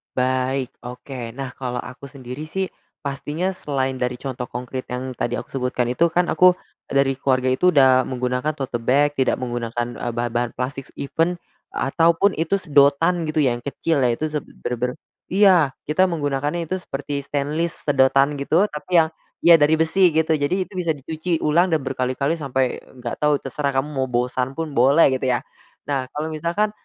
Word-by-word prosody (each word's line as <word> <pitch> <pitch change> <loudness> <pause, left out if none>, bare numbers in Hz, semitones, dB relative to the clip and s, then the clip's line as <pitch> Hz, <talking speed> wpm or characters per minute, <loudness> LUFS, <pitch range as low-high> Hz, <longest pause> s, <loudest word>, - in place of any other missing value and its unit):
Baik, 130 +1 0
oke. 125 -1 -7
Nah, 135 -2 -4
kalau 125 -2 -3
aku 125 +2 -10
sendiri, 135 +2 -8
sih, 190 +3 -2 0.3
pastinya 150 +6 -2
selain 135 -7 -2
dari 125 0 -1
contoh 130 -2 -5
konkrit 125 +1 -5
yang 130 +1 -4
tadi 120 +1 -1
aku - - -6
sebutkan 125 -2 -1
itu, 165 +7 +3
kan, 175 +1 +1
aku 180 0 +6 0.3
dari 135 -1 +1
keluarga 130 -1 +1
itu 180 +8 +3
udah 130 -2 +5
menggunakan 125 +3 -1
tote 130 -4 -3
bag, 140 +5 +3
tidak 130 - +3
menggunakan, 120 -1 -2
eee, 120 - -2
bahan-bahan 120 0 -1
plastik, 135 +2 -4
even 165 +5 0 0.4
atau 165 +4 +2
pun 200 +4 +3
itu 165 +5 0
sedotan, 155 0 +3
gitu, 155 -1 +1
yang 120 -2 +1
kecil, 140 +4 -1
ya, 125 - +4
itu 155 - -3
se 150 - -1
bener-bener 125 -2 -4 0.3
iya, 180 -8 +4
kita 185 +5 +2
menggunakannya 145 0 -1
itu 185 - 0
seperti 145 -3 -4
stainless 145 +4 -2
sedotan, 135 0 +3
gitu, 160 +6 +3
tapi 150 +4 -4
yang, 160 - -3 0.3
ya, 170 -1 +8
dari 150 +2 +4
besi, 160 +4 +4
gitu. 160 0 +2
Jadi 180 +7 +1
itu 185 - -20
bisa 165 -3 0
dicuci 160 +4 -3
ulang 170 +5 +3
dan 160 -5 0
berkali-kali 135 +4 -1
sampai 130 -3 -1
nggak 120 -2 -7
tau 150 -1 +3
terserah 140 0 -3
kamu 135 +3 0
mau 130 -2 -1
bosan 125 +2 -1
pun 165 -2 -4
boleh, 140 +3 +5
gitu, 130 0 -1
ya. 125 -1 +1 0.4
Nah, 135 -3 -2
kalau 155 +2 -3
misalkan, 170 +7 -1
140 Hz, 175 wpm, -22 LUFS, 130-160 Hz, 0.4 s, ya